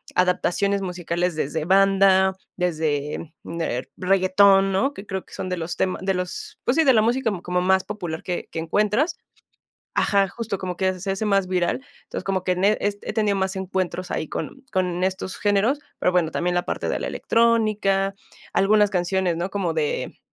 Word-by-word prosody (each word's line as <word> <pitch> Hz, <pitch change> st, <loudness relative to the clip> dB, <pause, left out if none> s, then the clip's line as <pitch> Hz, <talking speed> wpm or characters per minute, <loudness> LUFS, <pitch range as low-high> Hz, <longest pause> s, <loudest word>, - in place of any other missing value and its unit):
adaptaciones 185 Hz, +2 st, +1 dB
musicales 175 Hz, -1 st, -2 dB
desde 155 Hz, +1 st, -2 dB
banda, 190 Hz, 0 st, +4 dB, 0.2 s
desde 155 Hz, -2 st, -2 dB
der 165 Hz, -7 st, -3 dB
reggaetón, 195 Hz, +1 st, +4 dB
¿no? 270 Hz, +9 st, +1 dB
Que 200 Hz, -, -9 dB
creo 190 Hz, -1 st, -4 dB
que -, -, -18 dB
son 185 Hz, -, -4 dB
de 180 Hz, -, -2 dB
los 170 Hz, +1 st, -4 dB
tema 185 Hz, -, 0 dB
de 195 Hz, 0 st, 0 dB
los, 180 Hz, -1 st, -5 dB
pues, 250 Hz, -, +1 dB
sí, 325 Hz, -, +5 dB
de 265 Hz, -3 st, +5 dB
la 220 Hz, -, +5 dB
música 235 Hz, 0 st, +1 dB
como 180 Hz, 0 st, 0 dB
más 190 Hz, +1 st, +3 dB
popular 175 Hz, -6 st, -5 dB
que 180 Hz, -1 st, -3 dB
que 160 Hz, -, -4 dB
encuentras. 210 Hz, -, +1 dB, 0.8 s
Ajá, 200 Hz, -1 st, +3 dB
justo 225 Hz, -3 st, -4 dB
como 180 Hz, -1 st, -4 dB
que 185 Hz, -1 st, 0 dB
se 195 Hz, +1 st, -2 dB
hace 195 Hz, +3 st, -2 dB
más 195 Hz, -3 st, +2 dB
viral. 180 Hz, -2 st, +1 dB, 0.3 s
Entonces, -, -, -6 dB
como 190 Hz, -1 st, -1 dB
que 180 Hz, -1 st, +1 dB
ne 200 Hz, +4 st, +3 dB
es 205 Hz, 0 st, 0 dB
he -, -, -4 dB
tenido 210 Hz, -3 st, +1 dB
más 190 Hz, 0 st, -1 dB
encuentros 185 Hz, -1 st, -3 dB
ahí 155 Hz, -, -2 dB
con 270 Hz, -, -5 dB
con 180 Hz, -2 st, 0 dB
estos 190 Hz, 0 st, -2 dB
géneros, 210 Hz, +7 st, +2 dB, 0.2 s
pero, -, -, +2 dB
bueno, 175 Hz, -3 st, +1 dB
también 175 Hz, +1 st, -1 dB
la 175 Hz, -, 0 dB
parte -, -, -2 dB
de -, -, -1 dB
la -, -, -3 dB
electrónica, 215 Hz, -4 st, +2 dB, 0.4 s
algunas 210 Hz, +1 st, +4 dB
canciones, 180 Hz, -1 st, 0 dB
¿no?, 175 Hz, +3 st, -2 dB
como 185 Hz, -5 st, -1 dB
de 155 Hz, -2 st, -2 dB
190 Hz, 185 wpm, -23 LUFS, 180-200 Hz, 0.8 s, sí